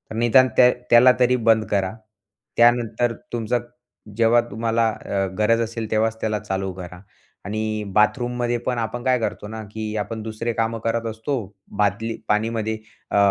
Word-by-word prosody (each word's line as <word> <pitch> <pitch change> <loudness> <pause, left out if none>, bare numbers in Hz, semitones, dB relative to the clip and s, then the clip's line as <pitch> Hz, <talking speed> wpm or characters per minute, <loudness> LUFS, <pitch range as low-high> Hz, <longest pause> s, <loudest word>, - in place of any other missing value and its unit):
निदान 120 +3 +5
त्या 125 0 +7 0.2
त्याला 120 +2 +8
तरी 125 0 +4
बंद 110 -1 +4
करा. 95 -1 0 0.6
त्यानंतर 120 0 +3 0.2
तुमचं 120 +1 0 0.6
जेव्हा 115 +1 +5
तुम्हाला 115 +1 +1
अ, 100 -2 -2
गरज 115 +2 +3
असेल, 115 -1 -4
तेव्हाच 110 +1 +1
त्याला 110 -1 -1
चालू 95 0 -3
करा. 90 -1 -9 0.4
आणि 110 +1 -2
बाथरूममध्ये 120 +2 +1
पण 125 -1 -1
आपण 115 +1 -3
काय 130 -1 +2
करतो 105 -2 -3
ना, 110 +1 -7
की 110 0 -5
आपण 110 +1 -4
दुसरे 110 +1 -3
कामं 115 0 -1
करत 115 +1 -1
असतो, 110 +5 -3 0.4
बादली 110 +3 0
पाणीमध्ये 110 +1 0 0.3
अ, - - +2
115 Hz, 150 wpm, -22 LUFS, 105-120 Hz, 0.6 s, त्याला